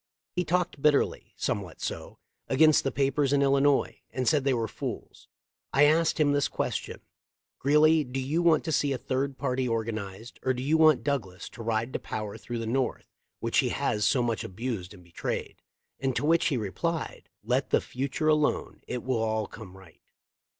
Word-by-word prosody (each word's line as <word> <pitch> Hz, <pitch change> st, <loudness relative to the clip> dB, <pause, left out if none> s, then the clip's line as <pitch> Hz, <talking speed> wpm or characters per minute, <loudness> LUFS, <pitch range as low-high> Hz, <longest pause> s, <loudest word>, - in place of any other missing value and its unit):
He 180 Hz, -, +1 dB
talked 175 Hz, -3 st, -1 dB
bitterly— 150 Hz, -1 st, +2 dB
somewhat 95 Hz, -5 st, -3 dB
so— -, -, -5 dB, 0.3 s
against 155 Hz, +3 st, +5 dB
the 135 Hz, -, 0 dB
papers 140 Hz, 0 st, +1 dB
in 140 Hz, -1 st, +3 dB
Illi 140 Hz, 0 st, +3 dB
nois, 145 Hz, -1 st, +3 dB, 0.2 s
and 130 Hz, -1 st, -3 dB
said 150 Hz, -4 st, +3 dB
they 135 Hz, -, +3 dB
were 115 Hz, -1 st, -1 dB
fools. -, -, -7 dB, 0.5 s
I 140 Hz, -, +5 dB
asked 160 Hz, +2 st, +3 dB
him 145 Hz, -2 st, +4 dB
this 145 Hz, 0 st, +2 dB
question -, -, -3 dB, 0.6 s
'Greeley, 150 Hz, +3 st, +4 dB
do 130 Hz, 0 st, -4 dB
you 145 Hz, +6 st, 0 dB
want 165 Hz, -3 st, +4 dB
to 160 Hz, -, -3 dB
see 145 Hz, -2 st, +1 dB
a -, -, -2 dB
third 135 Hz, +2 st, -2 dB
party 130 Hz, -2 st, -1 dB
organized, 110 Hz, -2 st, -4 dB
or 130 Hz, 0 st, 0 dB
do 125 Hz, -, -4 dB
you 150 Hz, +4 st, +2 dB
want 155 Hz, -3 st, +5 dB
Douglas 110 Hz, -11 st, -3 dB
to -, -, -11 dB
ride 115 Hz, +2 st, -1 dB
to -, -, -1 dB
power 105 Hz, -2 st, -5 dB
through 120 Hz, -, -6 dB
the 115 Hz, -, -3 dB
North, 125 Hz, +3 st, -2 dB, 0.3 s
which -, -, +1 dB
he -, -, +2 dB
has 105 Hz, -, -1 dB
so 125 Hz, +1 st, +3 dB
much 115 Hz, -2 st, -1 dB
abused 100 Hz, -2 st, -5 dB
and 90 Hz, -, -16 dB
betrayed?' 85 Hz, -1 st, -5 dB, 0.4 s
and 135 Hz, -2 st, -1 dB
to -, -, 0 dB
which 165 Hz, +2 st, +3 dB
he 140 Hz, -, +1 dB
replied, 155 Hz, -, -3 dB
Let -, -, 0 dB
the -, -, +4 dB
future 140 Hz, +4 st, -3 dB
alone; 150 Hz, -1 st, +1 dB
it 125 Hz, -2 st, -4 dB
will 130 Hz, -3 st, 0 dB
all 110 Hz, -1 st, 0 dB
come 95 Hz, -4 st, -11 dB
right. 95 Hz, -4 st, -17 dB
130 Hz, 190 wpm, -28 LUFS, 115-145 Hz, 0.6 s, against